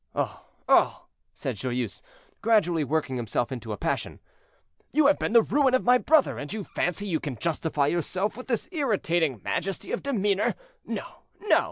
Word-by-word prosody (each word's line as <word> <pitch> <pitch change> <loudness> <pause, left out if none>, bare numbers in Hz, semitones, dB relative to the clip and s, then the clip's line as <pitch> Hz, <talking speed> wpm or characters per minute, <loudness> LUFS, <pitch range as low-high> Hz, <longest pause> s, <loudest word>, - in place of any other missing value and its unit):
"Oh, - - -2 0.2
oh!" - - +4 0.3
said - - -4
Joyeuse, 125 -3 -3 0.4
gradually 180 -8 +3
working 145 -2 -1
himself 120 +1 -1
into 120 -4 -5
a 105 - -3
passion, - - -2 0.7
"you 305 +1 +3
have 285 +1 +5
been - - -1
the 230 -1 +7
ruin 270 0 +3
of 255 - +1
my 250 +1 +5
brother, 310 +1 +3
and 145 - -6
you 215 -1 -3
fancy 180 +2 -2
you 170 -6 0
can 145 -4 -4
justify 160 -2 0
yourself 185 +7 -1
with 255 - -9
this 235 -4 -1
irritating 175 - 0
majesty 195 -1 -3
of - - -1
demeanor. 205 -7 +1 0.3
No, - - -4 0.4
no! 425 - +4
185 Hz, 170 wpm, -27 LUFS, 145-240 Hz, 0.7 s, the